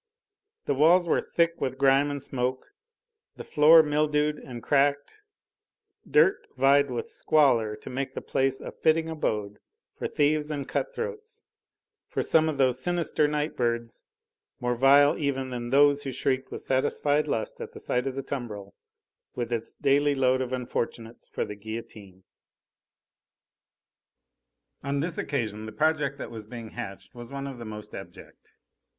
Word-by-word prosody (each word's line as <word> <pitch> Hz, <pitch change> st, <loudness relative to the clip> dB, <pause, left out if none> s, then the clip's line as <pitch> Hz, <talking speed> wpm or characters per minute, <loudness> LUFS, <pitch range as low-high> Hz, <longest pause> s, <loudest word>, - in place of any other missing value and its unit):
The -, -, +1 dB
walls 165 Hz, +6 st, +5 dB
were 170 Hz, -, +2 dB
thick 170 Hz, 0 st, 0 dB
with 130 Hz, 0 st, -2 dB
grime 135 Hz, +1 st, +4 dB
and 145 Hz, 0 st, -3 dB
smoke, 130 Hz, 0 st, -2 dB, 0.7 s
the -, -, -8 dB
floor 160 Hz, +2 st, +6 dB
mildewed 150 Hz, 0 st, +1 dB
and 120 Hz, -3 st, -9 dB
cracked; 145 Hz, -, +1 dB, 0.9 s
dirt 390 Hz, +1 st, +3 dB
vied 140 Hz, +1 st, +4 dB
with 120 Hz, -2 st, -4 dB
squalor 120 Hz, -8 st, +2 dB
to -, -, -16 dB
make 130 Hz, +1 st, -3 dB
the -, -, -5 dB
place 135 Hz, 0 st, 0 dB
a -, -, -7 dB
fitting 160 Hz, +1 st, +1 dB
abode 105 Hz, -10 st, -3 dB, 0.4 s
for -, -, -3 dB
thieves 150 Hz, +1 st, +1 dB
and 145 Hz, -3 st, -4 dB
cut -, -, -2 dB
throats, 465 Hz, -2 st, -6 dB, 0.6 s
for -, -, -2 dB
some 160 Hz, 0 st, +4 dB
of 150 Hz, -, -3 dB
those 130 Hz, -1 st, +2 dB
sinister 170 Hz, -3 st, +1 dB
night 150 Hz, +1 st, -2 dB
birds, 115 Hz, -1 st, -2 dB, 0.6 s
more 125 Hz, 0 st, 0 dB
vile 140 Hz, +3 st, +5 dB
even 135 Hz, -3 st, -2 dB
than 120 Hz, -1 st, -4 dB
those 145 Hz, +2 st, +4 dB
who 135 Hz, -, -4 dB
shrieked 130 Hz, +1 st, -1 dB
with -, -, -6 dB
satisfied 145 Hz, +3 st, +1 dB
lust 110 Hz, -6 st, -2 dB
at -, -, -6 dB
sight 125 Hz, +2 st, -1 dB
of 130 Hz, -, -3 dB
the 135 Hz, -, -4 dB
tumbril, 105 Hz, -8 st, -6 dB, 0.6 s
with 120 Hz, -1 st, -3 dB
its 115 Hz, -1 st, -3 dB
daily 145 Hz, +1 st, +2 dB
load 130 Hz, -1 st, +2 dB
of 130 Hz, -1 st, -3 dB
unfortunates 120 Hz, -2 st, -4 dB
for -, -, -3 dB
the -, -, -7 dB
guillotine. 105 Hz, -3 st, -9 dB, 2.6 s
On 140 Hz, +1 st, -2 dB
this 165 Hz, +3 st, -2 dB
occasion 110 Hz, -6 st, -3 dB
the -, -, -7 dB
project 145 Hz, +2 st, 0 dB
that -, -, -7 dB
was 110 Hz, -2 st, -8 dB
being 115 Hz, -1 st, -8 dB
hatched 100 Hz, -4 st, -8 dB
was 120 Hz, 0 st, -10 dB
one 140 Hz, 0 st, -5 dB
of 135 Hz, -3 st, -7 dB
the 115 Hz, -, -7 dB
most 105 Hz, -1 st, -9 dB
abject. -, -, -12 dB
135 Hz, 155 wpm, -27 LUFS, 120-150 Hz, 2.6 s, floor